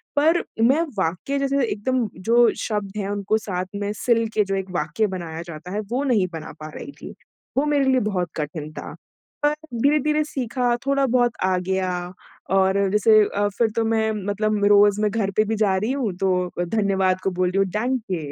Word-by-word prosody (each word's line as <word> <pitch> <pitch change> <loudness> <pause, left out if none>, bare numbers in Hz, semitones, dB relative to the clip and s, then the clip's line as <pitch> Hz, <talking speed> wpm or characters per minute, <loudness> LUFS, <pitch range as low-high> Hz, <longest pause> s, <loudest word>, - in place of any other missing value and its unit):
पर 320 +4 +3 0.2
मैं 265 +8 +4 0.2
वाक्य 185 +10 -1
जैसे 275 0 +1
एकदम 235 +3 -1 0.2
जो 235 +1 +4 0.2
शब्द 210 -2 -3
हैं, 200 -1 -2
उनको 205 +1 0
साथ 185 -4 -3
में 205 0 -2
सिल 230 +1 +1
के 210 - +3
जो 195 0 -2
एक 190 0 -3
वाक्य 175 +5 0
बनाया 170 -4 -5
जाता 170 +2 -8
है, 205 - -2
वो 235 +6 -2
नहीं 230 -9 +2
बना 160 -1 -6
पा 155 - -7
रही - - -7
थी। - - -8 0.4
वो 280 - +3
मेरे 290 -2 +2
लिए 260 - +4
बहुत 180 -4 -1
कठिन 150 0 -4
था। - - -7 0.5
पर 295 - +4 0.3
धीरे-धीरे 300 +1 +3
सीखा, 250 -4 -1
थोड़ा-बहुत 260 -3 +2
आ 185 0 +2
गया 185 0 -1 0.6
और 195 +1 +3
जैसे 215 +1 +5 0.2
अ, 205 0 +2
फिर 230 -2 +3
तो 230 -1 +1
मैं 220 -1 +1
मतलब 210 0 0
रोज़ 205 0 +5
मैं 210 -1 +2
घर 200 -2 -1
पे 215 - +5
भी 220 +1 -1
जा 195 -2 +2
रही 215 +6 -1
हूँ 260 -8 -1
तो 180 -1 +1
अ, - - +2
धन्यवाद 190 -1 +1
को 195 - 0
बोल 180 - +3
रही 190 - -2
हूँ 195 0 +3
डाँके! 210 - -2
210 Hz, 195 wpm, -23 LUFS, 190-240 Hz, 0.6 s, जैसे